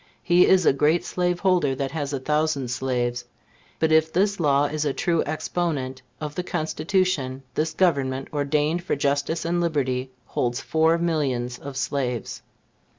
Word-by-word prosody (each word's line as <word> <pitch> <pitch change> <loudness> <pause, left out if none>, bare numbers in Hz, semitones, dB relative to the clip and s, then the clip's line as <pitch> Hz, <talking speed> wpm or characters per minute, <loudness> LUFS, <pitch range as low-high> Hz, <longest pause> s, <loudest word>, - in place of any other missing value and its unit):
He 175 0 +5
is 185 -2 +4
a - - +5
great 150 +5 +2
slaveholder 180 -5 +1
that 135 0 -3
has 145 -3 -3
a 140 - -2
thousand 150 -2 0
slaves; 125 -1 -1 0.5
but 160 0 +1
if 160 0 +4
this 200 +3 +1
law 145 -3 +3
is 150 +1 -2
a 145 -2 0
true 170 +1 +1
exponent 150 -4 -2 0.2
of 150 -1 -5
the 180 - -2
Constitution, 160 -5 -1
this 155 +1 -1
Government, 135 -7 +1
ordained 150 +3 0
for - - -1
justice 145 +4 0
and 175 +1 0
liberty, 135 -6 -1 0.2
holds 120 +1 -1
four 160 +1 +2
millions 135 -8 -1
of 140 -2 -7
slaves. 130 -3 -2
150 Hz, 155 wpm, -24 LUFS, 135-170 Hz, 0.5 s, He